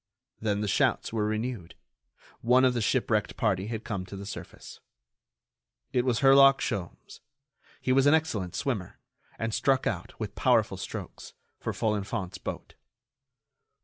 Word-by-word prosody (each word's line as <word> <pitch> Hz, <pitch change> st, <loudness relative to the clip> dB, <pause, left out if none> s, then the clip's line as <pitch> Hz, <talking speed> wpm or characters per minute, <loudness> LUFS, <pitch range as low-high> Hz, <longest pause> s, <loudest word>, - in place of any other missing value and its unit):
Then 105 Hz, -2 st, -1 dB
the 105 Hz, -, -1 dB
shouts 100 Hz, -, +1 dB
were 105 Hz, -2 st, 0 dB
renewed: 110 Hz, -4 st, -3 dB, 0.7 s
one 125 Hz, +2 st, +4 dB
of 125 Hz, -, +3 dB
the 120 Hz, -, -1 dB
shipwrecked 110 Hz, -2 st, 0 dB
party 100 Hz, -3 st, 0 dB
had 115 Hz, 0 st, -4 dB
come 100 Hz, -4 st, -3 dB
to 100 Hz, -, -8 dB
the 100 Hz, +1 st, -7 dB
surface. 100 Hz, -, -9 dB, 1.1 s
It 125 Hz, -1 st, +2 dB
was 120 Hz, -3 st, +1 dB
Herlock 135 Hz, 0 st, +7 dB
Sholmes. 90 Hz, -4 st, -5 dB, 0.6 s
He 130 Hz, -, -1 dB
was 135 Hz, +1 st, +4 dB
an 150 Hz, -, +7 dB
excellent 110 Hz, -, -2 dB
swimmer, 110 Hz, -10 st, -3 dB, 0.4 s
and 115 Hz, -1 st, -3 dB
struck 135 Hz, +2 st, +2 dB
out, 90 Hz, -6 st, -3 dB
with -, -, -4 dB
powerful -, -, +2 dB
strokes, -, -, -7 dB, 0.3 s
for -, -, -3 dB
Folenfant's 100 Hz, -2 st, -2 dB
boat. -, -, -6 dB
110 Hz, 145 wpm, -28 LUFS, 100-130 Hz, 1.1 s, Herlock